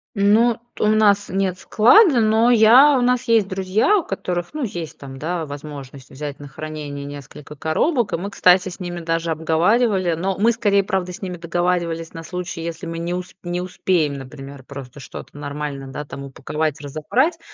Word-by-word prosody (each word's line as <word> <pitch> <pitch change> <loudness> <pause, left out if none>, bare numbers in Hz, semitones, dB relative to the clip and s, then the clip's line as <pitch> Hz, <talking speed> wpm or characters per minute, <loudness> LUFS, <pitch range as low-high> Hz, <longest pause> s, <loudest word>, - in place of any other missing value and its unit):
Ну, 215 +4 +3 0.2
т - - -6
у 215 - +4
нас 210 -2 +3
нет 190 -1 -1
склада, 250 - +5
но 220 +2 +4
я 245 +5 +7
у - - +1
нас 250 0 +2
есть 225 -3 +4
друзья, 195 - +2
у - - -1
которых, 180 - -4
ну, 300 -3 -2
есть 175 -8 -6
там, 135 -1 -9
да, 165 +1 -2
возможность 140 -2 -9
взять 145 +1 -7
на 145 - -9
хранение 145 -1 -7
несколько 145 +1 -10
коробок, 210 - 0
и - - +3
мы, 195 +4 -5
кстати, 185 -1 +4
с 180 - -11
ними 175 -1 -5
даже 165 0 -2
обговаривали. 175 +4 +2
Но 185 +3 -2
мы 225 +4 +4
скорее, 205 -3 +2
правда, 190 -2 -2
с 180 - -11
ними 180 -2 -4
договаривались 170 -1 -1
на 165 0 -8
случай, 180 0 -5
если 170 +2 -5
мы 165 0 -5
не 170 +1 -3
ус 180 0 -6
не 175 0 -2
успеем, 180 -4 0
например, 135 0 -10
просто 135 -1 -10
что-то 145 - -10
нормально, 145 -1 -5
да, 150 - -5
там 140 -1 -8
упаковать, 150 +3 -3
разобрать, 195 - 0
175 Hz, 185 wpm, -21 LUFS, 150-205 Hz, 0.2 s, я